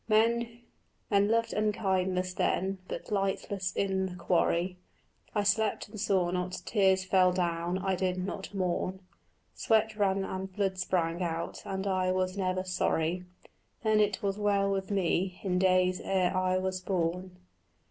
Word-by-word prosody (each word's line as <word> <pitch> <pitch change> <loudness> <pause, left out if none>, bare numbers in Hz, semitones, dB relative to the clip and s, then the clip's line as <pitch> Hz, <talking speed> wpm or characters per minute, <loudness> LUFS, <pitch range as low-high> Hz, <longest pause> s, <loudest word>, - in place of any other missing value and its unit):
Men 230 +2 +2 0.5
loved 215 +3 +2
unkindness 190 -3 0
then, 190 +1 0
but - - -6
lightless 195 -1 -1
in 190 -1 0
the 180 - -7
quarry 175 +1 +1 0.6
I 205 - +2
slept 210 0 +1
and 215 0 -9
saw 185 -3 +1
not; 180 0 -3
tears 190 -3 +3
fell 185 -1 +4
down, 175 0 -1
I 190 0 -1
did 185 0 0
not 190 +1 -4
mourn; 185 -1 -2 0.5
Sweat 220 -1 +2
ran 195 -2 +1
and 190 0 -5
blood 190 -1 -1
sprang 175 -2 0
out 165 -1 -3
and 190 0 -3
I 185 -1 +1
was 185 0 0
never 185 -1 -1
sorry: 180 -1 0 0.6
Then 215 -1 +3
it 205 -2 +1
was 200 +1 -1
well 200 -1 +2
with 195 -1 -2
me, 185 -1 0
in 180 -2 +1
days 185 -1 +3
ere 185 -1 +1
I 185 0 +2
was 185 0 -2
born. 180 0 -2
190 Hz, 145 wpm, -30 LUFS, 185-200 Hz, 0.6 s, fell